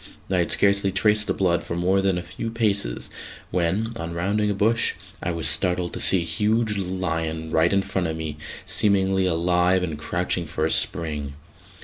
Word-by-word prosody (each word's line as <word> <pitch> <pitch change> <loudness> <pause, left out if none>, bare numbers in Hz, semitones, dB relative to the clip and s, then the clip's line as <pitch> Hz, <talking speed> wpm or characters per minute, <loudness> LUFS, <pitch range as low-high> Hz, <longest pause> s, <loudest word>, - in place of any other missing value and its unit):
I 95 - +2
had 85 - +1
scarcely 100 -1 +3
traced 105 +2 +2
the 95 - +1
blood 90 -3 +1
for 85 - -4
more 95 +3 +2
than 95 -2 +1
a 90 - -3
few 115 - -5
paces 105 - -1 0.4
when, 95 +6 0
on 85 0 -5
rounding 100 +5 0
a - - +1
bush, 110 +3 +2 0.3
I - - -2
was 85 -2 -2
startled 90 +3 0
to - - -3
see 95 - +3
a - - -3
huge 110 +3 +1
lion 80 -4 -3
right 80 +2 +3
in 100 0 +2
front 95 -3 -2
of 80 0 -3
me, 80 -2 -5 0.3
seemingly 95 -2 +2
alive 90 +2 +2
and 80 -4 -4
crouching 90 +1 -1
for 80 - -1
a 80 - 0
spring. 75 -4 0
90 Hz, 190 wpm, -24 LUFS, 85-100 Hz, 0.4 s, scarcely